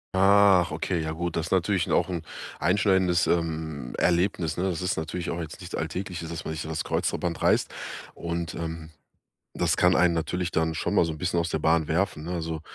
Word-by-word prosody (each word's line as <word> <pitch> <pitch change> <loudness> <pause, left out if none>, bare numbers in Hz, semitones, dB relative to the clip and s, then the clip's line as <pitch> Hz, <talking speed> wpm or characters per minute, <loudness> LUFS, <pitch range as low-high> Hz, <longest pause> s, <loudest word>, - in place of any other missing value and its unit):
Ach, 95 -2 +5
okay, 80 +2 -1
ja 80 - -2
gut. 85 +1 -3
Das 80 0 -1
ist - - -10
natürlich 95 -1 +2
'n - - -5
auch - - +2
'n 85 -3 -3 0.4
einschneidendes, 95 -1 +3
ähm, 80 -5 -2
Erlebnis, 85 -2 +1
ne? 90 - 0
Das 90 -3 -1
ist 90 +1 -1
natürlich 80 +2 -3
auch 85 - -3
jetzt 80 -2 -6
nichts 90 -1 -7
Alltägliches, 85 0 -4
dass 85 - -6
man 80 - -3
sich 75 - -4
so 80 - -7
das 80 -2 -2
Kreuzband 85 -2 -1
reißt. - - +3 0.5
Und, 85 -1 -4
ähm, 80 -1 -5 0.7
das - - +1
kann 90 0 +4
einen 90 -1 +4
natürlich 85 +2 -2
dann 80 0 +1
schon - - -1
mal - - +5
so 80 - -2
'n 75 - -8
bisschen 85 0 0
aus 85 - -1
der 80 - -1
Bahn 80 0 +2
werfen, 85 -1 0
ne? 85 - -6
Also, 80 -1 -3
85 Hz, 215 wpm, -26 LUFS, 80-90 Hz, 0.7 s, Ach